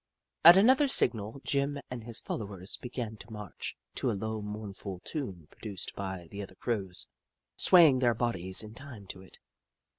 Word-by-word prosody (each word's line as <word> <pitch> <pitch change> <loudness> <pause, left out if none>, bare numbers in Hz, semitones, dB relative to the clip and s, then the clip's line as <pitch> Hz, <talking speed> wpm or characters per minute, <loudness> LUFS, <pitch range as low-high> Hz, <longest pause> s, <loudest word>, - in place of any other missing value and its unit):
At 170 +3 +11
another 260 +8 +6
signal, 115 - 0
Jim 140 +1 0
and 120 -3 -5
his 115 0 -2
followers 100 -3 -5
began 120 -3 -5
to - - -10
march, 105 -4 -7 0.2
to - - -1
a - - +1
low 110 +1 -3
mournful 105 -2 -6
tune 95 - -5
produced 100 -5 -7
by 95 -3 -5
the 100 - -5
other 95 -1 -9
Crows, 95 -5 -2 0.5
swaying 165 -8 +7
their 120 -2 +3
bodies 95 -5 +1
in 110 0 -9
time 125 -5 -10
to 95 - -7
it. 95 - -14
110 Hz, 160 wpm, -30 LUFS, 95-130 Hz, 0.5 s, At